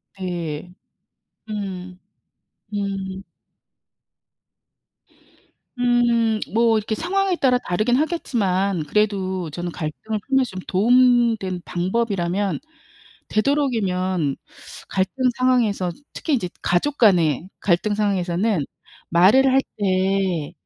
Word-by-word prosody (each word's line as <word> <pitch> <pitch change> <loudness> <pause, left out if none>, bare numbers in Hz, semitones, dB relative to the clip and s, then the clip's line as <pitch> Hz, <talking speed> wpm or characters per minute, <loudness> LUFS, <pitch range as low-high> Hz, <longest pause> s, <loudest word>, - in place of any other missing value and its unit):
네. 175 -3 -5 0.8
음. 185 -3 -5 0.8
음. 195 -1 -3 2.6
음 235 -2 +2
뭐 230 0 +4
이렇게 215 +1 -2
상황에 380 - 0
따라 255 -4 +3
다르긴 215 +2 0
하겠지만 200 - 0
그래도 190 -2 0
저는 175 +3 -5
갈등을 175 +7 -4
풀면서 265 -2 +2
좀 185 - -6
도움 240 +3 +4
된 185 -3 -4
방법이라면 190 0 -1 0.7
되도록이면 195 - 0 0.5
갈등 195 +7 0
상황에서 235 -8 +2 0.2
특히 310 - -1
이제 225 -9 -1
가족 285 +12 0
간의 175 - +3
갈등 200 +3 +1
상황에서는 195 -3 0 0.5
말을 215 +11 +5
할 270 - +5 0.2
때 190 -4 0
200 Hz, 205 characters per minute, -22 LUFS, 180-240 Hz, 2.6 s, 말을